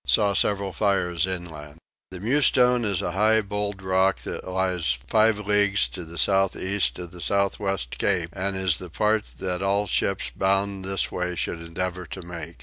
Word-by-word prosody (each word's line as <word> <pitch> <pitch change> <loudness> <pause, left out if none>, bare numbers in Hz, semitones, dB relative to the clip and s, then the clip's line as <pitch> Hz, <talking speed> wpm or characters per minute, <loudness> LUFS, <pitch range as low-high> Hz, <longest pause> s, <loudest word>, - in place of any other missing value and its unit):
Saw 105 -2 +3
several 100 -1 +2
fires 90 -3 0
inland. 80 -5 -6 0.3
The 95 - -8
Mewstone 125 +1 +3
is 100 -4 -1
a 90 - -1
high 110 +4 +3
bold 105 -1 -4
rock 95 +1 +2
that - - -6
lies 90 -7 +1
five 110 +4 +3
leagues 100 -6 +2
to 85 +8 -7
the 85 +1 -11
south 95 +3 +2
east 100 +1 0
of 90 -2 -8
the 90 - -11
south 100 +1 +1
west 95 - -3
cape 90 -4 +1
and 95 0 -2
is 95 -5 +1
the 90 - -8
part 105 +5 +1
that 90 -1 -3
all 100 +1 +1
ships 95 - 0
bound 100 0 0
this 95 0 -1
way 90 0 -2
should 85 - -2
endeavour 90 +1 -4
to 95 +4 -8
make. 85 -1 -8
95 Hz, 180 wpm, -25 LUFS, 90-100 Hz, 0.3 s, Saw